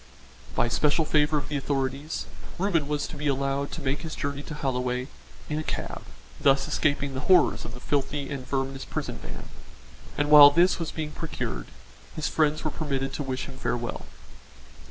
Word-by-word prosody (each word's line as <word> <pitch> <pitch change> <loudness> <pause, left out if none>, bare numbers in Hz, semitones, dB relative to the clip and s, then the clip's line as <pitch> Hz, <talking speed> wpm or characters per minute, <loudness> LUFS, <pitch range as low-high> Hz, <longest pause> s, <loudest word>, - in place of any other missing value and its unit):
By - - +3
special 145 +7 +2
favour 150 0 +3
of 140 -3 -3
the 150 - -1
authorities, 135 +2 -2 0.3
Reuben 175 -6 +1
was 150 0 -1
to - - -8
be 150 0 -3
allowed 140 0 0
to 160 - -6
make 140 +2 0
his 160 -2 -5
journey 140 0 -3
to 150 - -7
Holloway 125 -2 -1 0.4
in 150 0 -2
a - - -3
cab, - - -4 0.4
thus 135 0 +4
escaping 145 -2 0
the 130 - -3
horrors 185 - +5
of 115 - -7
the - - -9
filthy 145 +1 -1
and 140 -2 -4
verminous 135 0 -2
prison - - -4
van, - - -8 0.7
and 145 0 +1
while 145 -1 +12
this 175 +6 +3
was 165 - -2
being 155 -2 -4
procured, 150 - -4 0.5
his 155 - -1
friends 155 -1 +1
were 155 - -1
permitted 135 -3 -2
to - - -3
wish 130 -2 -3
him 135 -1 -10
farewell. 120 -1 -2
145 Hz, 180 wpm, -27 LUFS, 135-150 Hz, 0.7 s, while